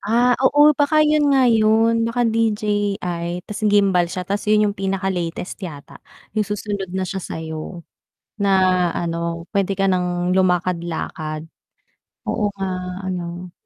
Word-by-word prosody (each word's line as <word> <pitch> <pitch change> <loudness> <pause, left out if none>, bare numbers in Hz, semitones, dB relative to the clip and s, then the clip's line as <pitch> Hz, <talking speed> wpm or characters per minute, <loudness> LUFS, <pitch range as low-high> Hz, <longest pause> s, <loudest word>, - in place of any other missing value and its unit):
Ah, 240 +4 +3
oo, 290 +3 +6
baka 305 +1 +4
'yon 300 -1 +3
nga 270 -2 +4
'yon, 225 0 +3
baka 240 +1 0
DJI 205 -6 -1
'tas 210 0 -7
gimbal 195 -4 +3
siya 185 +1 -4
'tas 200 +3 -2
'yon 215 0 +4
'yong 205 - +1
pinakalatest 190 -2 -3
yata, 155 -7 -9 0.3
'yong 215 -1 -1
susunod 205 -2 -3
na 190 - 0
siya 190 +1 -4
sa - - -6
'yo. 160 +1 -7 0.6
Na 200 - +2 0.5
ano, 170 0 -3
puwede 195 -1 0
ka 195 - +2
nang 180 -1 0
lumakad-lakad. 170 -4 -1 0.8
Oo 210 - 0
nga 195 -1 -2 0.4
ano, 175 -1 -5
195 Hz, 135 wpm, -21 LUFS, 175-215 Hz, 0.8 s, oo